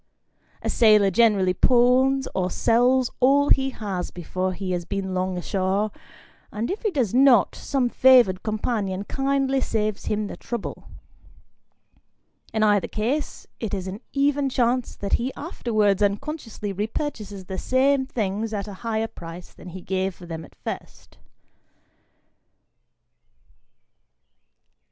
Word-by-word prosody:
A - - -1
sailor 210 -4 +5
generally 200 -3 +3
pawns 260 +4 +3
or 185 -1 0
sells 245 +5 +2
all 280 +3 +4
he 270 0 +3
has 200 -8 -4
before 185 +2 -3
he 185 0 -4
has 175 -1 -1
been 190 +1 -4
long 185 0 -1
ashore, 195 +3 -1 0.6
and 220 +7 -3
if 405 - -4
he 435 - +1
does 255 - -1
not, 255 -4 +5
some 270 -3 -1
favoured 240 -7 +5
companion 210 -3 -2
kindly 270 +2 0
saves 215 -3 -2
him 210 0 -1
the - - -6
trouble. 235 -3 -6 1.7
In 220 - 0
either 205 -2 +3
case, 245 +8 -3
it 215 -3 -3
is 185 -2 -4
an 195 +4 -6
even 280 0 +1
chance 250 -1 0
that 200 - -4
he 255 +3 -2
afterwards 215 - 0
unconsciously 215 -1 -2
repurchases 210 -2 -4
the 190 0 -5
same 265 +1 +2
things 215 -1 -2
at 200 0 -4
a 205 - -7
higher 225 -1 -1
price 175 -4 -10
than 180 - -12
he 185 +1 -8
gave 190 0 -2
for 180 - -12
them 165 -1 -6
at - - -16
first. - - -8
215 Hz, 130 wpm, -24 LUFS, 190-260 Hz, 1.7 s, sailor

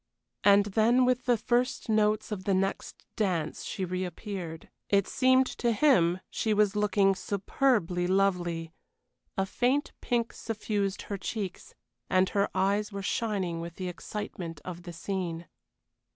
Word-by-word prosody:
And 200 0 +6
then 225 +5 +3
with 255 0 +1
the 245 -2 +3
first 245 +4 0
notes 215 -1 +2
of 190 -3 -4
the 195 - +2
next 195 +1 -2
dance 175 -7 -1
she 190 - -3
reappeared. 180 -1 -5 0.2
It 200 -1 +3
seemed 260 0 +4
to 235 -1 +2
him 185 - +4
she 220 -1 0
was 205 -1 +3
looking 205 -1 +3
superbly 190 -2 0
lovely: 175 -4 0 0.6
a 195 - +2
faint 255 +8 0
pink 235 -1 0
suffused 210 -3 -2
her 200 -1 -5
cheeks, 195 -2 -5 0.3
and 185 0 +3
her 200 -1 +1
eyes 200 +3 +1
were 200 -1 -5
shining 190 -6 -1
with 170 0 -7
the 185 -1 -4
excitement 175 -3 -6
of 180 -1 -6
the 175 0 -8
scene. 170 -1 -4
200 Hz, 140 wpm, -29 LUFS, 180-215 Hz, 0.6 s, And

